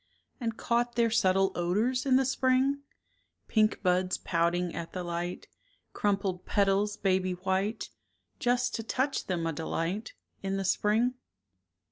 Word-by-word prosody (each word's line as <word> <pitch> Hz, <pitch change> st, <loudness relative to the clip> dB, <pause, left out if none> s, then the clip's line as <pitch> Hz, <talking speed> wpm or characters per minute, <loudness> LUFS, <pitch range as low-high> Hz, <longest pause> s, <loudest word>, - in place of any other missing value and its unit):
And 230 Hz, -3 st, -3 dB
caught 240 Hz, 0 st, 0 dB
their 230 Hz, -1 st, +3 dB
subtle 195 Hz, -3 st, +3 dB
odors 215 Hz, +11 st, 0 dB
in 260 Hz, -, +5 dB
the 265 Hz, 0 st, +4 dB
spring? 260 Hz, +1 st, +2 dB, 0.7 s
Pink 215 Hz, -1 st, +2 dB
buds 185 Hz, 0 st, +2 dB
pouting 170 Hz, +1 st, 0 dB
at 170 Hz, -1 st, -6 dB
the 185 Hz, -, -3 dB
light, 175 Hz, +1 st, -4 dB, 0.5 s
Crumpled 195 Hz, -3 st, 0 dB
petals 200 Hz, 0 st, +1 dB
baby 185 Hz, -1 st, +1 dB
white, 190 Hz, +4 st, -2 dB, 0.5 s
Just 245 Hz, +1 st, +1 dB
to -, -, -2 dB
touch 260 Hz, +5 st, -1 dB
them 175 Hz, -3 st, -1 dB
a 165 Hz, -, -1 dB
delight 165 Hz, +6 st, -3 dB
— -, -, -45 dB
In 195 Hz, 0 st, -2 dB
the 195 Hz, -, -2 dB
spring? 220 Hz, +6 st, +2 dB
195 Hz, 140 wpm, -29 LUFS, 180-235 Hz, 0.7 s, in